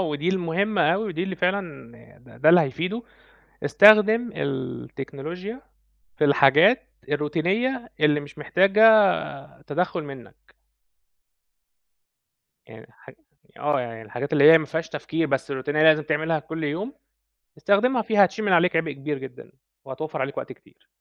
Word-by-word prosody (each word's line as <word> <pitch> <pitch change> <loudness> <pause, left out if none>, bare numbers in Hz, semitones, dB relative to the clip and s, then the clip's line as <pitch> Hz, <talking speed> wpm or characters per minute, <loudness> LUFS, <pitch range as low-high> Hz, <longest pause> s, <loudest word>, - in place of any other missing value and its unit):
ودي 155 -2 -2
المهمة 190 +2 -1
أوي 205 +4 -3
ودي 175 -5 -4
اللي 190 -1 -5
فعلًا 180 -10 -3 0.3
ده 120 -2 -19
ده 155 - +2
اللي 175 +1 +7
هيفيده، 175 - -3 0.6
استخدم 215 +3 +5
التكنولوجيا 140 - -6 0.6
في - - +2
الحاجات 145 - +4 0.3
الروتينية 190 - -2
اللي 150 -1 +2
مش 145 +1 -13
محتاجة 195 +7 +1 0.8
تدخُّل 175 +2 -3
منّك. 135 -4 -14 2.1
يعني - - -15
حج - - -18 0.5
آه، 145 -1 0
يعني 115 -2 -8
الحاجات 140 +7 -7
اللي 150 +1 +7
هي 165 - +7
ما 155 - -6
فيهاش 160 +2 -4
تفكير 155 +2 -3
بس 135 -1 -3
الروتينية 145 +3 -2
لازم 155 0 +5
تعملها 160 +1 -1
كل 160 +1 -7
يوم، 185 - -4 0.6
استخدمها 235 +5 +1
فيها 210 -2 +3
هتشيل 215 +4 -6
من 200 - 0
عليك 175 0 +3
عِبء 160 -2 0
كبير 145 +1 -5
جدًا 130 -1 -12 0.3
وهتوفَّر 135 +3 -6
عليك 135 +1 -4
وقت - - -6
كتير. - - -19
160 Hz, 135 wpm, -23 LUFS, 145-195 Hz, 2.1 s, اللي